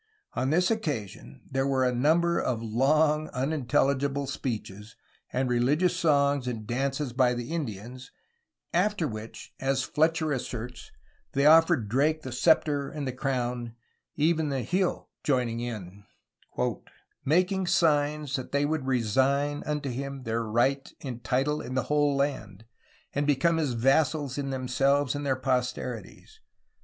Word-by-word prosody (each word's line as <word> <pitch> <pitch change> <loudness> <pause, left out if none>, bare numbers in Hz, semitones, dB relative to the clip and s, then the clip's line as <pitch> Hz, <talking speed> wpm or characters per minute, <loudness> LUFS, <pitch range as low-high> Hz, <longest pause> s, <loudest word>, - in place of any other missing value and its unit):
On 130 - -1
this 180 +6 +3
occasion 110 - -4
there 135 +1 0
were 130 -1 +2
a 125 - +1
number 165 +7 +2
of 125 -3 -1
long, 150 +7 +2
unintelligible 140 0 0
speeches 110 -6 -5 0.4
and 130 +1 0
religious 145 +9 +2
songs 140 -6 +2
and 115 -3 -4
dances 135 +3 -2
by 125 -1 +3
the 120 +3 -5
Indians, 125 - -5 0.6
after 185 -2 +1
which, 110 -2 -8
as 135 0 0
Fletcher 160 +1 +1
asserts, 125 -2 -5 0.4
they 140 +1 +2
offered 155 -8 +5
Drake 150 +7 +1
the 130 - -6
sceptre 145 +1 +2
and 145 -2 -5
the - - -1
crown, 125 -3 -2 0.4
even 155 0 +2
the 135 -3 -1
Hi6h 185 - 0 0.2
joining'in, 115 - -2 1.2
"making 185 +5 +2
signes 150 -3 +2
that 130 - -7
they 140 +1 +2
would 150 -2 -1
resigne 135 +4 +1
vnto 150 -1 -3
him 140 +1 -5
their 115 -1 -1
right 120 +5 0
and 120 -4 -6
title 135 +4 0
in 130 - -6
the 130 - +1
whole 145 -1 +3
land, 115 -8 -2 0.5
and 145 +1 0
become 150 +4 +3
his 150 -6 0
vassals 135 +3 +1
in 140 -1 -2
themselues 135 +1 +1
and 145 0 -4
their 130 -1 0
posterities 125 -4 -3
135 Hz, 135 wpm, -28 LUFS, 125-150 Hz, 1.2 s, offered